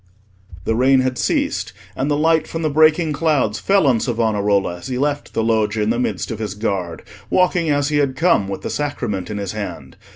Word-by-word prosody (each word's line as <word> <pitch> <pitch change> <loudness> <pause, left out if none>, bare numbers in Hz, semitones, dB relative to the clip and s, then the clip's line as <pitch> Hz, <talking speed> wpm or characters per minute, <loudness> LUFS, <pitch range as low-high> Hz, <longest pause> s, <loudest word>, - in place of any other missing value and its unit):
The - - +1
rain 130 +3 +4
had 130 -1 -2
ceased, - - -1 0.2
and 135 +3 -1
the 145 - +1
light 160 +1 +2
from 165 0 -4
the 155 - 0
breaking 155 +1 +3
clouds 145 -8 +1
fell 195 -4 +2
on 125 -4 +3
Savonarola 105 -6 0
as - - -9
he 130 -1 -3
left 145 +2 -2
the 115 - +1
Loggia 110 -1 +1
in 105 - +1
the 120 - -1
midst 125 - -2
of 110 - -5
his 105 -3 -4
guard, 95 -6 -3 0.3
walking 180 -3 +2
as 145 0 +1
he 150 - +1
had 140 -2 +1
come, 135 - +2
with 95 - -5
the - - -3
Sacrament 120 -10 -3
in 105 - -4
his 100 -2 -3
hand. 105 -1 -7
125 Hz, 215 wpm, -20 LUFS, 105-150 Hz, 0.3 s, rain